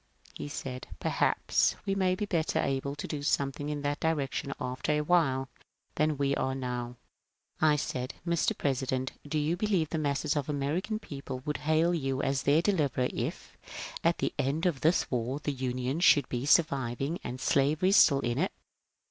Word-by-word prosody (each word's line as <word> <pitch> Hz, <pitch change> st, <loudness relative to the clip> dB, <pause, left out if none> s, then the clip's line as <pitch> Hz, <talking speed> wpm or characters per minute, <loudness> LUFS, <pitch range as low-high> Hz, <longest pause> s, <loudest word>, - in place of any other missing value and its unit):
He -, -, -6 dB
said, 130 Hz, -3 st, -6 dB
" -, -, -17 dB
Perhaps -, -, +2 dB
we 195 Hz, -, 0 dB
may 185 Hz, -2 st, +2 dB
be 210 Hz, -, -2 dB
better 165 Hz, -5 st, 0 dB
able 140 Hz, +1 st, -1 dB
to 145 Hz, -, -5 dB
do 150 Hz, -2 st, -4 dB
something 145 Hz, 0 st, 0 dB
in 145 Hz, -1 st, -3 dB
that 145 Hz, 0 st, -1 dB
direction 145 Hz, -3 st, -1 dB
after 125 Hz, +3 st, -2 dB
a 150 Hz, -, +1 dB
while 150 Hz, -5 st, +2 dB, 0.5 s
than 155 Hz, -1 st, +1 dB
we 140 Hz, 0 st, +1 dB
are 130 Hz, 0 st, -1 dB
now." 125 Hz, -2 st, -4 dB, 0.7 s
I 155 Hz, -1 st, +5 dB
said, 130 Hz, -3 st, -3 dB
" 170 Hz, -, -16 dB
Mr. 170 Hz, -1 st, +1 dB
President, 130 Hz, -1 st, -1 dB, 0.2 s
do 155 Hz, +2 st, -1 dB
you 150 Hz, +3 st, +1 dB
believe 180 Hz, -5 st, +1 dB
the 160 Hz, -, -1 dB
masses 145 Hz, 0 st, 0 dB
of 145 Hz, -2 st, -1 dB
the 150 Hz, -, -1 dB
American 155 Hz, +10 st, -1 dB
people 135 Hz, -9 st, -7 dB
would 150 Hz, -, -1 dB
hail 160 Hz, +3 st, +2 dB
you 135 Hz, -5 st, -1 dB
as 135 Hz, -1 st, +1 dB
their 150 Hz, +5 st, +3 dB
deliverer 145 Hz, -10 st, +1 dB
if, -, -, -4 dB, 0.5 s
at -, -, +3 dB
the -, -, -1 dB
end 145 Hz, +6 st, 0 dB
of 165 Hz, -7 st, +1 dB
this 165 Hz, +3 st, +3 dB
war, 125 Hz, +3 st, -1 dB
the 145 Hz, -1 st, -2 dB
Union 130 Hz, +2 st, -2 dB
should 145 Hz, -6 st, +5 dB
be 125 Hz, +2 st, -2 dB
surviving 140 Hz, -1 st, +2 dB
and 125 Hz, +1 st, -5 dB
slavery 150 Hz, +8 st, +2 dB
still 140 Hz, -8 st, +6 dB
in 120 Hz, +1 st, -1 dB
it? 185 Hz, -, +1 dB
145 Hz, 185 wpm, -30 LUFS, 130-160 Hz, 0.7 s, still